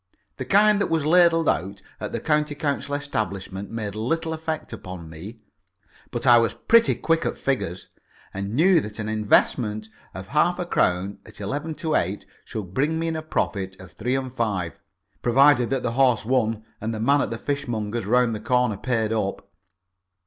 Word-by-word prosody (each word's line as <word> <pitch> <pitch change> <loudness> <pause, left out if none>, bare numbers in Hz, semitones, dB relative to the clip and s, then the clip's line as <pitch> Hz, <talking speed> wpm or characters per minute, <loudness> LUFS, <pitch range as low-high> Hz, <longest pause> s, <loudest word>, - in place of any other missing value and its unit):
The 130 - -4
kind 205 +6 +4
that - - 0
was 160 -3 0
ladled 165 0 +5
out 95 +4 -1 0.2
at - - -5
the - - -2
County 150 -1 0
Council 145 -1 -2
establishment 100 -8 -4
made 110 -3 -4
little 160 +10 -1
effect 160 0 -4
upon 90 -3 -8
me. 100 +9 -10 0.7
But - - -4
I 120 -1 +8
was 115 - 0
pretty 230 0 +4
quick 165 0 +1
at - - -2
figures, 110 -10 -2 0.5
and 100 +3 -4
knew 175 +4 +5
that 105 -3 -8
an 110 -1 -4
investment 110 0 +1 0.3
of 95 0 -8
half 170 +6 +2
a 180 - -3
crown 95 - 0
at - - -15
eleven 145 +10 -3
to 160 0 -2
eight 95 - 0 0.2
should 95 -5 -7
bring 150 +8 +1
me 165 0 -1
in 160 - -2
a 160 - -3
profit 95 -11 -2
of 90 -1 -12
three 125 +4 -2
and 130 -1 -4
five 100 -8 -2 0.4
provided 125 0 +4
that 135 -2 -1
the 120 - 0
horse 125 -3 +3
won 110 -3 0 0.2
and 110 +1 -2
the - - -5
man 140 +6 +3
at - - -1
the 115 - -4
fishmonger's 120 -6 -3
round 125 0 +3
the 105 - -4
corner 125 -4 +1
paid 115 -2 -1
up. 100 -2 -3
120 Hz, 185 wpm, -24 LUFS, 105-150 Hz, 0.7 s, I